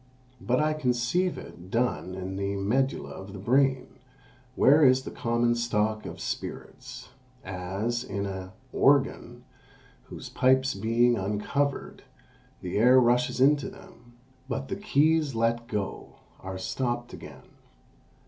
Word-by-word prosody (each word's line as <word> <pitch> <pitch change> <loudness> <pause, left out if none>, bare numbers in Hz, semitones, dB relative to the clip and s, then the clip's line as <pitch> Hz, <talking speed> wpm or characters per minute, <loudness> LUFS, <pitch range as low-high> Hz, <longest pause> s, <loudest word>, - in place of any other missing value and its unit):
But 125 +1 +1
I 155 0 +2
conceive 145 +6 0
it 90 +1 -11
done 115 -5 -1
in 95 0 -5
the 100 +1 -2
medulla 125 +8 -1
of 95 +1 -9
the - - -7
brain, 130 +5 +2 0.7
where 150 +4 +5
is 130 -1 +5
the - - -7
common 120 0 +1
stock 110 -2 -1
of - - -8
spirits; - - -7 0.3
as 95 +6 -3
in 100 -5 -4
an 95 -1 -5 0.2
organ, - - +2 0.6
whose - - -9
pipes 130 +1 +2
being 115 +4 +2
uncovered, 105 +8 -2 0.6
the 90 +1 -3
air 125 +3 +7
rushes 125 +1 +2
into 140 +1 +3
them; 120 0 -16 0.4
but 135 +1 -3
the - - -2
keys 155 - +2
let 115 +1 0
go, 105 -4 -4 0.2
are 95 0 -6
stopped 120 +5 -3
again. - - -11
120 Hz, 130 wpm, -27 LUFS, 100-130 Hz, 0.7 s, air